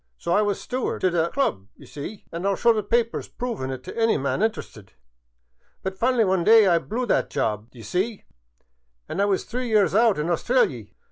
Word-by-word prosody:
So 170 - -2
I 210 - +4
was 205 -2 0
steward 255 0 -3
t' 185 - +3
the 170 -1 0
Club, 210 - -1
d' - - -22
ye - - -12
see 150 +9 -8
— - - -35
an' 170 - -5
I 200 - +1
'11 195 - 0
show 235 -1 +4
the 215 - -1
papers 230 +3 0
provin' 230 - -4
it 130 -1 -6
t' - - -8
any 225 -1 +2
man 140 +7 -1
interested 165 - -3 0.4
— - - -44
but 190 0 -4
fin'ly 245 -1 +3
one 185 -2 +1
day 220 +2 +7
I 175 -3 +4
blew 235 +8 -3
that 220 - +1
job, 105 +1 -2
d'ye 120 -2 -13
see; 190 - -2 0.8
an* 195 - -2
I - - +4
was 200 -2 0
three 250 +1 -4
years 205 -7 +3
out 225 0 +4
in 150 - -1
Australy. 170 - 0
195 Hz, 225 wpm, -24 LUFS, 150-230 Hz, 0.8 s, day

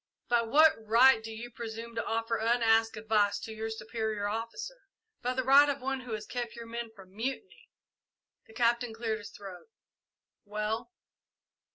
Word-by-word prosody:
"By 240 -1 +4
what 300 +8 +6
right 230 +2 +6
do 225 - -6
you 235 +2 -8
presume 230 0 -7
to 230 - -2
offer 225 0 -1
unasked 225 -1 +3
advice 210 -2 +2
to 220 - -6
your 220 +1 -4
superior 220 -1 -3
officer?" 390 - -5 0.3
"By 250 +1 -1
the 260 - 0
right 280 +3 +7
of 280 0 -1
one 270 +1 -2
who 250 -3 -7
has 215 0 -4
kept 240 0 -4
your 235 0 -8
men 235 0 -5
from 190 -2 -15
mutiny!" 265 - -5 0.8
The 220 - -16
Captain 235 0 +1
cleared 225 -1 -2
his 205 - -9
throat. 195 - -11 0.8
"Well?" 215 - -3
230 Hz, 165 wpm, -30 LUFS, 220-245 Hz, 0.8 s, right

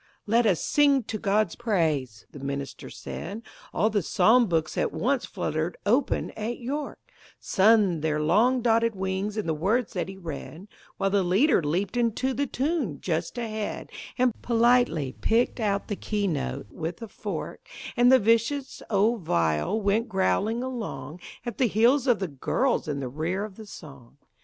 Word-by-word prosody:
"Let 230 +2 +3
us 180 -7 +1
sing 280 -3 +3
to 215 0 -5
God's 205 -3 +1
praise," 155 - -1
the 145 - -10
minister 140 0 -5
said, 205 +7 -7 0.3
All 215 +2 +1
the 205 -1 +1
psalm 225 +7 +4
books 160 -3 -1
at - - 0
once 260 +3 0
fluttered 160 -2 -3
open 245 +6 +1
at 225 +3 -4
"York," 280 +4 -4 0.4
Sunned 195 -5 +3
their 155 -1 0
long 220 +11 +3
dotted 230 -1 +2
wings 190 +2 -2
in 215 - -1
the 160 - 0
words 205 +9 0
that 180 0 -2
he 190 - -8
read, 170 +2 -8 0.3
While 195 - 0
the 200 0 +3
leader 195 - +3
leaped 175 +9 -1
into 240 +2 0
the 285 +2 -1
tune 265 - -1
just 165 +5 -2
ahead, 220 -3 -4 0.3
And 250 -2 +3
politely 235 - +2
picked 235 +3 +1
out 200 -3 0
the 205 - -2
key 205 +1 -2
note 100 - -3
with 165 +1 -5
a - - -6
fork, - - -6 0.3
And 245 0 +5
the 260 - +8
vicious 230 +5 +1
old 220 +2 +2
viol 85 - 0
went 210 +4 +1
growling 205 +5 +1
along 180 - -5 0.3
At 240 - -5
the 255 - +4
heels 240 +6 +3
of 245 -3 +4
the 195 - -3
girls 165 - 0
in 145 -2 -2
the 130 - -3
rear 165 +9 -2
of 210 -3 -11
the 220 0 -11
song. 140 -9 -12
205 Hz, 170 wpm, -26 LUFS, 165-235 Hz, 0.4 s, the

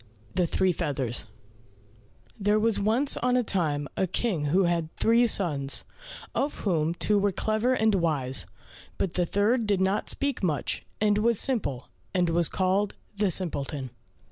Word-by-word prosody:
63 185 - +2
The - - 0
Three 185 +3 +1
Feathers 135 -8 0 1.1
There 205 +1 +2
was 225 0 +2
once 230 +8 +1
on 250 0 +1
a 250 - +2
time 150 -8 -1
a 190 - 0
King 185 -4 -1
who 180 +7 +3
had 170 -2 0
three 235 +2 +3
sons, 145 -10 +1 0.5
of 285 +2 -2
whom 165 -4 0
two 205 +3 +2
were 200 0 +2
clever 220 +6 0
and 220 -2 +2
wise, 150 -8 0 0.5
but 180 - -1
the 180 -1 0
third 215 +5 +1
did 200 -2 +2
not 190 +2 0
speak 280 -2 -1
much, 160 -7 -2
and 210 -1 +2
was 230 0 +2
simple, 165 - -1 0.3
and 175 -2 +2
was 170 -1 +2
called 190 +2 0 0.2
the 200 -1 +1
Simpleton. 145 -7 -2
190 Hz, 160 wpm, -27 LUFS, 160-215 Hz, 1.1 s, who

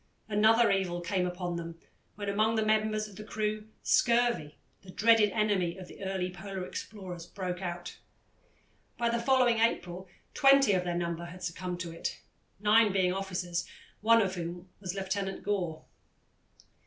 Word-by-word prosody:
Another 220 +2 +4
evil 185 -3 0
came 180 +1 0
upon 180 -1 -3
them 165 0 -6 0.4
when 205 0 -5
among 215 +3 +2
the 220 -1 +1
members 215 0 +1
of 200 -3 -14
the 215 - -7
crew 215 0 -3 0.2
scurvy, 235 -10 +2 0.2
the 195 - -15
dreaded 220 +2 +4
enemy 200 -5 0
of 185 -1 -9
the - - -11
early 190 -1 -2
Polar 190 0 -6
explorers, 180 -5 -7
broke 180 -1 -4
out. 175 -1 -5 1.0
By 235 -1 +1
the 235 0 0
following 245 -2 +3
April 185 -5 0 0.3
twenty 275 -5 +6
of 180 -1 +1
their 175 -1 -1
number 170 0 -2
had 180 +1 -10
succumbed 180 +1 -4
to 170 -2 -5
it, 165 - -4 0.4
nine 210 +1 +5
being 185 -2 +2
officers, 180 -3 -3 0.3
one 230 +1 +5
of 190 -1 -2
whom 175 +1 -6
was 185 -1 -5
Lieutenant 195 0 -3
Gore. 180 -6 -2
195 Hz, 155 wpm, -30 LUFS, 180-215 Hz, 1.0 s, twenty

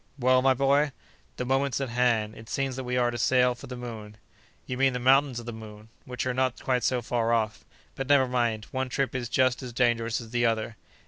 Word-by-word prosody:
"Well, 130 -1 +3
my 130 0 +4
boy?" 140 +2 +2 0.4
"The 125 - -3
moment's 135 +1 0
at 135 -2 -3
hand. 115 -3 +1
It 110 - -12
seems 135 -2 -2
that 130 - -5
we 125 0 -1
are 120 -1 +2
to 120 - -5
sail 125 -1 +3
for 120 - -12
the 125 - -6
moon." 110 -3 -8 0.5
"You 125 - -4
mean 135 0 +2
the 125 - -2
Mountains 130 0 +3
of 120 - -10
the 120 - -5
Moon, 110 0 -11 0.2
which 125 0 -4
are 130 - 0
not 130 0 0
quite 125 -2 0
so 125 -2 0
far 115 -1 0
off. 110 -2 0 0.3
But, 135 +1 -5
never 140 -2 +5
mind, 120 -3 -1
one 130 0 -2
trip 135 +1 -1
is 125 -3 -3
just 130 0 +2
as 125 -2 -7
dangerous 115 -2 +1
as 115 -2 -10
the 120 -1 0
other!" 115 -1 0
125 Hz, 235 wpm, -27 LUFS, 115-130 Hz, 0.5 s, never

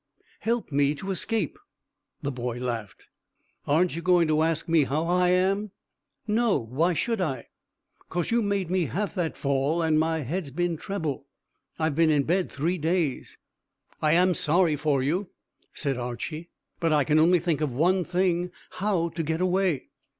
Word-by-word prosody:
"Help 230 -5 -1
me 145 +1 +2
to 195 +7 -5
escape." 195 - -1 0.6
The 140 - -1
boy 120 -2 -4
laughed. 115 -5 -4 0.6
"Aren't 165 +5 +2
you 170 - -4
going 175 -2 +4
to 155 0 +3
ask 165 0 0
me 165 -3 +4
how 150 +5 -1
I 180 +1 +2
am?" 195 +3 +2 0.6
"No; 225 0 +2
why 145 +9 0
should 230 +4 0
I?" 135 -9 -3 0.6
"'Cause 175 +4 -2
you 235 0 +3
made 200 -4 -1
me 185 -2 +2
have 200 +6 -2
that 175 -5 -2
fall, 140 +4 0
and 155 -1 +3
my 160 0 +1
head's 155 +4 -3
been 175 +4 -1
trebble. 155 -6 -4 0.5
I've 160 -2 0
been 165 +2 +3
in 145 -2 +3
bed 180 +5 0
three 170 +6 -1
days." 160 -3 -1 0.6
"I 155 0 +3
am 180 +2 +4
sorry 175 -1 +2
for 145 -2 +1
you," 175 +8 -1 0.4
said 140 -4 -2
Archy; 155 +7 -5 0.3
"but 165 -1 +1
I 150 -2 +4
can 155 +2 +3
only 175 +3 +5
think 160 -3 -1
of 150 -3 0
one 180 +8 +2
thing 180 0 0 0.2
how 185 -4 0
to 165 +1 -4
get 160 +1 -1
away." 185 -5 +1
165 Hz, 170 wpm, -26 LUFS, 145-180 Hz, 0.6 s, only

